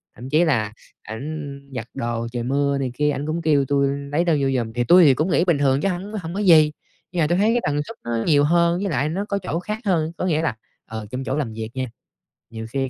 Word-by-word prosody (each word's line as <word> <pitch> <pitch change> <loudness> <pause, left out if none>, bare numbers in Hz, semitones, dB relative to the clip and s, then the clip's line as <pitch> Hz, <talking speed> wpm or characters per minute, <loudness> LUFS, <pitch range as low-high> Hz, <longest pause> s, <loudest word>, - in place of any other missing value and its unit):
Thậm 125 +2 -9
chí 155 +4 +4
là 110 -8 0 0.3
ảnh 140 +5 -6 0.2
giặt 115 -2 -4
đồ 115 -2 -3
trời 120 -1 -3
mưa 140 +2 +1
này 130 -3 -2
kia, 150 +1 +1
ảnh 145 +1 -4
cũng 165 +2 -2
kêu 145 -4 +3
tui 140 0 +2 0.2
lấy 160 +4 +2
đồ 170 - +3
vô 135 - +2
giùm. 115 -2 -3
Thì 120 0 0
tui 175 +8 +7
thì 135 - +7
cũng 155 +8 0
nghĩ 175 - +3
bình 170 -5 +3
thường 140 0 +2
chứ 195 - +1
hổng 190 +4 -4
hổng 165 +1 -6
có 200 - -3
gì. 160 -6 +6 0.4
Giờ 170 -4 +1
tui 175 +2 +1
thấy 210 +3 +3
cái 240 - +1
tần 145 0 0
suất 230 - -9
nó 115 -1 -1
nhiều 145 -3 +5
hơn 170 +2 +3
với 200 - -1
lại 145 +2 0
nó 195 +5 -2
có 200 - 0
chỗ 170 - -2
khác 210 +4 -4
hơn, 165 -4 +1
có - - -2
nghĩa 160 -3 +1
là, 155 -9 -1 0.3
ờ, 110 -1 -6
trong 130 +1 -4
chỗ 135 - -2
làm 120 -7 -2
việc 110 0 -5
nha, 130 0 -1 0.6
nhiều 110 -1 -7
khi 135 -1 -1
145 Hz, 265 wpm, -22 LUFS, 130-170 Hz, 0.6 s, tui